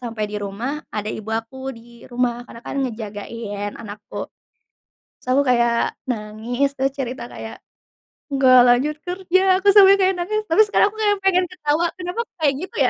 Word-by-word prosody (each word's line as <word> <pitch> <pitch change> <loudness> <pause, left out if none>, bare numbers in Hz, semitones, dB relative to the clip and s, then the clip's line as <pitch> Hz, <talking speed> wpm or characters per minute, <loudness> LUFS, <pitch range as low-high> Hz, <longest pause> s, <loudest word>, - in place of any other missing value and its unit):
sampai 230 -3 -4
di 210 0 -5
rumah, 235 +10 -4
ada 210 0 -4
ibu 220 0 -8
aku 230 +4 -4
di 235 0 -15
rumah. 245 -1 -2
Karena, 230 - -11
kan, 275 - -3
ngejagain 205 -1 -6
anakku. 210 -2 -7 1.0
Sel 255 +2 +2
aku - - +1
kayak 235 -1 +2
nangis, 235 +4 -2
terus 265 +1 0
cerita 250 -2 -5
kayak, 225 - -9 0.7
"Nggak 260 -2 +6
lanjut 270 +5 +2
kerja," 375 +1 +2
aku 405 - +4
sampai 395 -1 +8
kayak 380 0 +3
nangis, 430 +5 -1
tapi 330 +6 +5
sekarang 415 0 +3
aku 435 - -14
kayak 410 -1 +3
pengen 365 -1 +4
ketawa, 335 -2 0
kenapa, 360 +5 -5
kok, - - -67
kayak 290 -3 +3
gitu, - - -19
ya? - - +4
255 Hz, 170 wpm, -21 LUFS, 225-355 Hz, 1.0 s, sampai